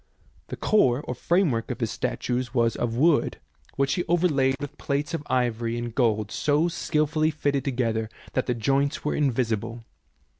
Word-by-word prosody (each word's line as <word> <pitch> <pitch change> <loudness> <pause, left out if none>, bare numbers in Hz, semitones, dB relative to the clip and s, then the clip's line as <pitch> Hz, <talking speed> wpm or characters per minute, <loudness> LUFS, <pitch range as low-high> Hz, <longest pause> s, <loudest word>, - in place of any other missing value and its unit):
The - - -5
core 135 - +3
or 125 - -4
the 125 - -15
framework 165 -11 +1
of - - -4
his - - -1
statues 125 0 -2
was 115 -1 +2
of 115 -1 -2
wood, 150 +4 +3 0.4
which 135 0 +1
he 175 - 0
overlaid 155 -6 +2
with 145 - -7
plates 140 +3 -2
of 165 - -1
ivory 120 -2 0
and 120 -1 -4
gold 110 -4 +1
so 150 +3 +2
skilfully 155 -1 +1
fitted 145 -3 -1
together 115 -5 -1 0.2
that 130 - 0
the 125 - +1
joints 140 +6 0
were 150 - +1
invisible. 115 -4 -1
130 Hz, 165 wpm, -25 LUFS, 120-150 Hz, 0.4 s, core